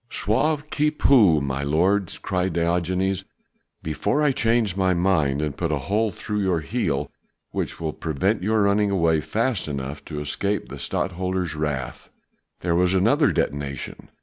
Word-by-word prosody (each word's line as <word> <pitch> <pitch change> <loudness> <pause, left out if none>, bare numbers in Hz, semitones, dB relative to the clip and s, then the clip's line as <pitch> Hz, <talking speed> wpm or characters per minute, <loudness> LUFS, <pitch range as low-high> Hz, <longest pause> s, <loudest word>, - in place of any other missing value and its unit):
"Sauve 150 +9 0
qui 150 0 +2
peut, 110 - +4
my 70 0 -2
lord!" 90 +6 +1
cried 90 -1 -1
Diogenes, 90 +3 0 0.6
"before 80 - 0
I 145 - +4
change 115 -6 +1
my 95 -2 +2
mind 80 -6 +1
and 75 -2 -2
put 85 -2 -2
a 75 - +1
hole 105 +11 0
through 105 +1 -4
your 95 -5 +1
heel, 80 - -2 0.4
which - - -3
will 80 -2 -3
prevent 90 +7 -1
your 110 +2 +2
running 100 +1 +3
away 85 -5 +2
fast 110 - -1
enough 70 0 -5
to 75 -2 -5
escape 100 +8 -2
the - - -8
Stadtholder's 90 -2 -2
wrath." 75 -4 -4 0.5
There 85 -1 0
was 90 +2 +2
another 125 - +3
detonation. 70 -1 -3
90 Hz, 150 wpm, -24 LUFS, 75-105 Hz, 0.6 s, peut